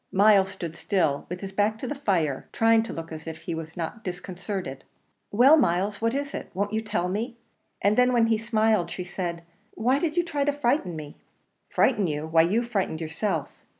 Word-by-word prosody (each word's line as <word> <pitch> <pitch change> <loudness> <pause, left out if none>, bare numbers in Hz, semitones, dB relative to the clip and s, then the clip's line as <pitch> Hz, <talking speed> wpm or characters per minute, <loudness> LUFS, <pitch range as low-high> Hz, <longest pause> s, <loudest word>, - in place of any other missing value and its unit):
Myles 195 -1 +5
stood 170 -4 -6
still, 160 -8 0
with 180 +1 -5
his 195 -1 -5
back 210 +2 +1
to 240 - -6
the 290 - -2
fire, 175 - -1
trying 225 0 +4
to 225 - -5
look 165 0 -7
as 160 0 -8
if 160 0 -7
he 170 - -3
were 160 -1 -4
not 175 +6 -5
disconcerted. 180 -5 -5 0.5
"Well, 260 +9 +6
Myles, 200 - +1
what 230 +2 +1
is 280 0 -3
it? - - -5
won't 205 +2 -1
you 220 - +1
tell 210 -5 -1
me?" 225 +6 -3 0.5
And 205 +1 +4
then, 250 +1 +4
when 235 -2 +4
he 225 -1 +2
smiled, 220 -5 +2
she 180 - -5
said, 175 -2 -4 0.3
"Why 255 +5 +2
did 320 +1 -1
you 350 - +4
try 295 -4 -3
and 285 0 +1
frighten 240 - +1
me?" 150 -2 -8 0.5
"Frighten 200 -3 +2
you! 150 0 -2
why 160 +1 +4
you 200 +9 +2
frightened 200 -9 -2
yourself." 165 +6 -2
200 Hz, 205 wpm, -26 LUFS, 170-230 Hz, 0.5 s, Well